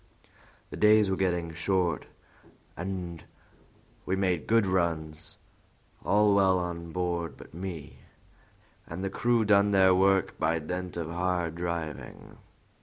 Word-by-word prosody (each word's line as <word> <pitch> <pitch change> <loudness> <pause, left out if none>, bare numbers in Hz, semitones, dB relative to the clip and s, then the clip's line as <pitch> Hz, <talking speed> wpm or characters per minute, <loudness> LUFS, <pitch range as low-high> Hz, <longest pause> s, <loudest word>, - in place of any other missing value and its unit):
The - - -6
days 105 -2 +5
were - - +2
getting 85 -3 -1
short, 85 0 0 0.7
and 90 -2 -5 0.8
we 95 - -1
made 95 -3 0
good 115 -1 +4
runs, 80 -4 -2 0.7
all 105 0 +4
well 95 -2 +4
on 85 -2 -4
board 85 -1 -2
but - - -14
me, 85 -3 -7 0.9
and 85 +3 -6
the 95 - -2
crew 120 +1 +2
done 100 -1 +4
their 95 -2 +5
work 95 0 +2
by 80 +1 +1
dint 90 +3 -5
of 85 -1 -4
hard 90 -1 -1
driving." 85 -2 -6
90 Hz, 125 wpm, -28 LUFS, 85-95 Hz, 0.9 s, days